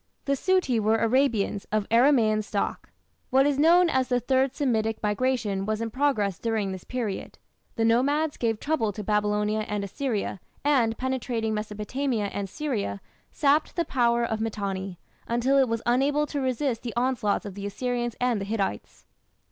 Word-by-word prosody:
The 280 - +1
"Suti" 280 -5 +1
were 220 +1 +2
Arabians 225 -4 +1
of 215 -1 0
Aramaean 230 -3 +4
stock. 205 -1 -3 0.4
What 265 +1 +4
is 285 -1 +1
known 345 +4 +6
as 260 -5 +1
the 245 -1 +1
"Third 260 +2 +1
Semitic 225 -6 0
Migration" 210 -2 0
was 215 0 -1
in 225 -1 -3
progress 215 -8 0
during 220 -4 -1
this 190 -1 -7
period. 235 -6 -4 0.4
The 225 - +1
nomads 285 +7 +2
gave 225 -2 -1
trouble 285 -9 0
to 210 - -6
Babylonia 210 +1 +1
and 205 -1 -2
Assyria, 210 -1 -3 0.2
and, 250 -6 +2
penetrating 245 -4 -2
Mesopotamia 215 +2 -2
and 200 -1 -3
Syria, 215 - -3 0.3
sapped 295 +1 +2
the 340 - 0
power 235 -2 +2
of 220 -1 -2
Mitanni, 195 -4 -3 0.3
until 245 +4 +2
it 260 -3 +3
was 230 -1 -2
unable 280 +5 +2
to 290 -1 -3
resist 255 -2 -1
the 235 -2 -6
onslaughts 240 -5 0
of 200 - -6
the 200 +1 -5
Assyrians 240 +2 -2
and 245 -4 +1
the - - -3
Hittites. 200 - -3
230 Hz, 165 wpm, -26 LUFS, 210-265 Hz, 0.4 s, known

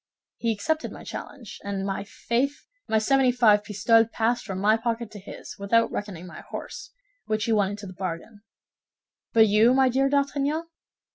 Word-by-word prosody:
He 230 - 0
accepted 310 +10 -1
my - - -10
challenge, 250 -8 -8
and, 200 -1 -3
my 195 0 -2
faith, 245 +7 -2 0.2
my 220 - +2
seventy 260 +3 +3
five 215 -4 +4
pistoles 220 +2 +3
passed 230 +1 0
from 190 -3 -4
my 210 +3 +4
pocket 230 -1 -3
to 210 - -9
his, 195 - -10
without 230 +3 +2
reckoning 190 -4 -5
my 180 - -10
horse, - - -7 0.4
which 215 0 0
he 230 - 0
won 205 -3 +3
into 205 0 -7
the 185 - -8
bargain. 185 +4 -6 0.9
But 225 -1 +6
you, 220 +4 +5
my 265 -1 +4
dear 270 +2 +2
D'Artagnan?" 285 +2 0
220 Hz, 170 wpm, -26 LUFS, 205-245 Hz, 0.9 s, But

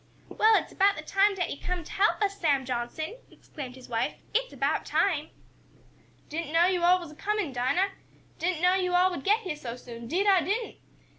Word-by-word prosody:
"Well, 440 0 +4
it's - - 0
about 400 +1 +3
time 395 +1 +3
dat 360 -2 -2
yo' - - -17
come 360 -1 -2
t' - - -12
help 405 +2 +2
us, 400 0 -1
Sam 280 -5 +2
Johnson!" 255 - -4
exclaimed 260 -5 -9
his 260 - -13
wife. 230 -1 -1 0.2
"It's - - 0
about - - 0
time!" 320 -6 0 1.0
"Didn't 320 0 -4
know 330 +2 +5
yo' 365 -1 +1
all 360 +1 +5
was 340 -4 -9
a - - -13
comin', 410 -4 -2
Dinah! 260 +11 +1 0.5
Didn't 350 -1 -1
know 360 0 +5
yo' 365 -1 +1
all 365 +1 +4
would 285 -7 -5
get 425 +3 +3
heah 360 -8 -4
so 245 -6 -6
soon, 235 -1 -10
'deed 365 - 0
I 390 -3 +5
didn't!" 415 +8 -2
355 Hz, 205 wpm, -28 LUFS, 290-390 Hz, 1.0 s, know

